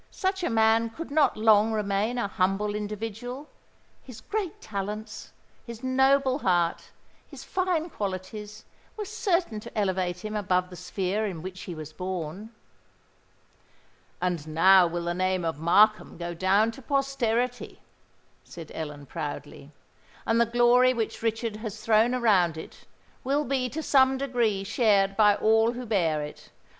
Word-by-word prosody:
Such 380 -1 -2
a - - 0
man 225 0 +3
could 320 +7 -8
not 295 -5 +3
long 215 0 +4
remain 210 +3 -1
a 240 - 0
humble 195 +2 0
individual: 225 +6 -5 0.5
his 250 -4 -11
great 400 - -4
talents—his 215 +3 -8
noble 265 +1 +3
heart—his 175 - -3
fine 360 -3 -1
qualities 210 +2 -6 0.3
were 420 - -4
certain 375 - -1
to 215 - -11
elevate 185 -2 -1
him 215 0 -4
above 185 -3 0
the - - -8
sphere 190 +4 -2
in 170 -5 -6
which 185 0 -7
he 175 - -6
was 155 -1 -9
born." 185 +3 -5 1.7
"And 175 -4 -2
now 180 +3 +6
will 170 0 -4
the 175 - -1
name 185 0 0
of 160 -3 -3
Markham 210 +7 +3
go 175 0 -5
down 195 +6 +2
to 270 - -12
posterity," 250 -3 -1 0.6
said 165 -3 -11
Ellen, 150 -2 -6
proudly: 145 -1 -7 0.6
"and 230 +1 +2
the 235 - +3
glory 240 +2 +4
which 225 -2 -3
Richard 225 -1 -2
has 215 -1 -6
thrown 225 +3 +3
around 190 -9 +2
it, 160 - -11 0.4
will 285 +3 0
be 255 -1 -1
to 315 +5 -5
some 265 -2 +4
degree 240 -7 0
shared 195 -2 +2
by 210 -1 +5
all 225 +2 +3
who 250 +1 -6
bear 165 -9 0
it. 150 - -10
215 Hz, 145 wpm, -27 LUFS, 185-245 Hz, 1.7 s, now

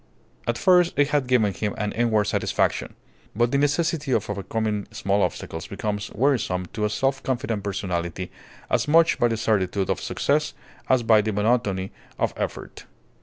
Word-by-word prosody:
At 120 0 0
first 180 0 +4
it 145 0 +3
had 145 -3 +1
given 110 -6 +3
him 105 0 -3
an 105 -1 -2
inward 115 -3 +2
satisfaction. 105 - 0 0.4
But 120 +2 +2
the 140 - +2
necessity 150 -1 +1
of - - 0
overcoming 105 +1 -2
small 105 -2 0
obstacles 80 -2 -3
becomes 105 +1 -3
wearisome 110 -8 +1
to 105 - -1
a - - +1
self 135 +5 0
confident 120 -5 -2
personality 90 -2 -3 0.4
as - - 0
much 165 +2 +4
by 120 - +4
the 115 -1 -1
certitude 100 -3 0
of - - -2
success - - 0 0.3
as 130 -2 +3
by 110 -1 +5
the 110 +1 -2
monotony 105 -3 0 0.3
of - - 0
effort. - - -5
110 Hz, 165 wpm, -24 LUFS, 100-130 Hz, 0.4 s, by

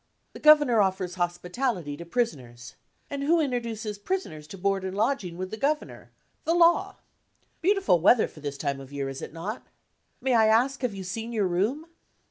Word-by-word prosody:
The - - -10
Governor 295 -7 +6
offers 190 -2 0
hospitality 180 - -2
to 170 - -9
prisoners. 130 - -3 0.4
And 280 -1 -3
who 325 +4 +3
introduces 230 -7 -2
prisoners 205 - -4
to 195 - -9
board 195 +1 0
and 190 +1 -4
lodging 210 -7 0
with 185 0 -5
the 220 - -5
Governor? 295 +6 -2 0.3
the 330 - +1
Law. 345 0 +4 0.7
Beautiful 385 - +3
weather 215 +7 +5
for - - -15
the 145 -1 -4
time 140 0 -3
of 135 0 -11
year, 140 -1 -3
is 135 0 -7
it - - -7
not? 180 +9 -6 0.5
May 260 -1 0
I 225 -2 +5
ask 250 +6 +2
have 245 -6 -1
you 190 - -6
seen 225 +5 -5
your 210 -4 +1
room?" 210 - -1
205 Hz, 180 wpm, -27 LUFS, 175-260 Hz, 0.7 s, Governor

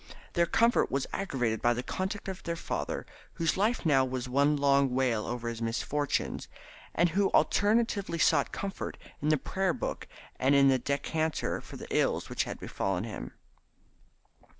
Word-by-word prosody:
Their 170 0 +3
discomfort 230 +6 +3
was 135 0 0
aggravated 125 - -1
by 120 0 +3
the 125 - -3
conduct 190 - -3
of 190 -1 -5
their 170 - -3
father, - - -3 0.3
whose 165 -1 0
life 210 +2 +1
now 135 -4 +5
was 130 -1 -3
one 140 +3 +3
long 140 -2 +3
wail 125 -5 +1
over 120 -1 -3
his 115 -1 -4
misfortunes, 140 +5 -1 0.5
and 175 +1 +4
who 195 +4 +2
alternately 205 -4 +2
sought 155 -3 +3
comfort 200 0 -4 0.2
in 150 - +1
the 155 - +4
Prayer 190 +5 -1
book - - -4 0.3
and 135 +2 +4
in 140 -1 +6
the 130 -1 +3
decanter 155 +4 -1
for - - -10
the - - -8
ills - - +1
which - - 0
had - - -6
befallen 95 -1 -2
him. 110 -1 -6
145 Hz, 165 wpm, -30 LUFS, 125-185 Hz, 0.5 s, in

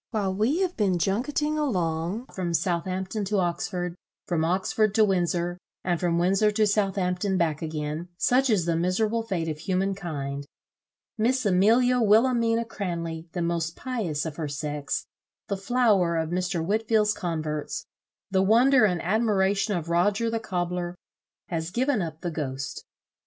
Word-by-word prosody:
while 200 -5 -1
we 235 - +1
have 365 -1 0
been 195 -5 +1
junketting 290 - 0
along 180 - -1
from 175 -3 -1
Southampton 185 +4 -1
to 205 +1 0
Oxford, 175 0 -1 0.3
from 165 -3 0
Oxford 195 +4 +1
to 220 - +6
Windsor, 175 -2 0 0.2
and 175 -2 0
from 170 -2 +1
Windsor 195 +5 +3
to 215 0 +3
Southampton 195 -2 0
back 160 -4 0
again, 155 +1 -4
such 255 +6 +3
is 200 -7 +2
the 170 -1 +1
miserable 210 +7 +1
fate 190 -7 -2
of 155 -1 -3
human 190 +3 0
kind! 140 -7 -5 0.7
Miss 250 +3 +2
Amelia 230 +7 +4
Wilhelmina 230 +1 +3
Cranley, 170 -6 -4
the 175 - -1
most 170 -1 -1
pious 210 - -3
of 155 -2 -5
her 160 -3 -2
sex, 145 0 -3 0.4
the 200 - 0
flower 195 -5 +2
of 160 0 -1
Mr. 180 -2 -1
Whitfield's 215 +1 +2
converts, 155 -5 -3 0.5
the 190 -1 +3
wonder 235 +4 +5
and 180 -4 0
admiration 205 0 +1
of 170 -1 -5
Roger 205 +7 +2
the 225 - 0
cobler, 180 -3 -3 0.5
has 165 -1 -2
given 250 +3 +1
up 160 -2 -5
the 175 - -3
ghost. 135 -3 -4
185 Hz, 150 wpm, -26 LUFS, 170-215 Hz, 0.7 s, to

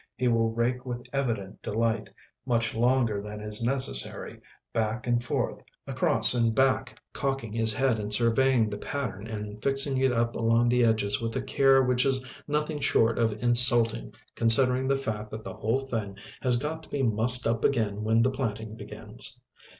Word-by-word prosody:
He 125 - -1
will 115 -1 +2
rake 120 +2 -2
with 120 -1 -6
evident 115 -8 -3
delight, 110 -1 -2 0.3
much 115 -2 -1
longer 120 -3 +1
than 105 +1 -8
is 105 +1 -6
necessary, 130 - -1 0.3
back 110 +1 -2
and 120 -1 0
forth, 120 - -2 0.3
across - - +4
and 115 -2 +1
back, 135 -1 0
cocking 135 -6 -3
his 115 -1 +2
head 125 0 0
and 105 0 -5
surveying 115 +1 +3
the 105 -1 -6
pattern 115 -7 -5
and 105 -1 -7
fixing 135 0 +2
it 130 -1 +2
up 115 -1 -1
along 115 +1 +2
the 125 0 +2
edges 110 -2 +2
with 115 -1 -4
a 130 - -1
care 135 0 +3
which 125 0 +1
is 130 -1 0 0.2
nothing 150 +1 -2
short 115 -4 +1
of 110 -1 -1
insulting 120 - +3 0.2
considering 125 +3 +3
the 135 0 +1
fact 110 -5 -5
that 110 0 -8
the - - -7
whole 115 +5 -1
thing 110 -7 -5 0.2
has 125 -2 +2
got 150 +5 -4
to - - -17
be 140 - -2
mussed 120 +2 +4
up 115 0 -1
again 105 -5 0
when 115 +1 +2
the 130 - +1
planting 110 -4 -4
begins. 110 +2 -7
115 Hz, 175 wpm, -27 LUFS, 110-130 Hz, 0.3 s, across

